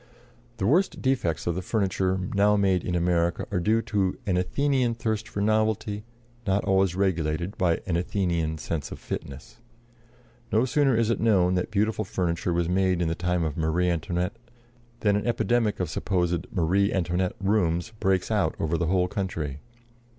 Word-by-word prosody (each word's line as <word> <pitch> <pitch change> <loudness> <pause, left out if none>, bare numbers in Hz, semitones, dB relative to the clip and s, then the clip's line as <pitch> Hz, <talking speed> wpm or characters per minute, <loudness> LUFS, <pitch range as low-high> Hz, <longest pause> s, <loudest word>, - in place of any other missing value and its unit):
The 95 - -1
worst 170 - +2
defects 125 - 0
of 85 - +1
the 90 - -3
furniture 95 -2 0 0.2
now 105 +1 +4
made 95 -3 +2
in 90 - -2
America 85 -1 +1
are 95 - +1
due 110 +5 +2
to 95 -3 0
an 95 - +1
Athenian 125 +5 +1
thirst 110 -1 -2
for 100 - -3
novelty, 110 -1 0 0.4
not 95 +1 +1
always 95 -2 +2
regulated 85 -1 0
by 85 -3 +1
an 90 - -1
Athenian 85 -3 -1
sense 75 -2 -4
of - - -6
fitness. 70 -2 -7 0.9
No 110 +3 +3
sooner 135 0 +2
is 115 0 +2
it - - 0
known 95 -5 +3
that 90 0 -1
beautiful 110 +1 0
furniture 90 -2 -1
was 85 0 +1
made 95 0 +2
in 85 -2 +1
the - - 0
time 90 0 -1
of 80 -3 -2
Marie 85 +2 +1
Antoinette 90 +4 -2 0.6
than 105 -2 +3
an 105 +3 -1
epidemic 120 -2 +1
of 90 - 0
supposed 90 0 -1
"Marie 100 +1 +2
Antoinette" 90 0 0
rooms 95 -1 0
breaks 95 -1 +1
out - - +1
over 80 +1 0
the 85 - 0
whole 90 +1 +2
country. 80 -8 -3
95 Hz, 170 wpm, -26 LUFS, 85-105 Hz, 0.9 s, now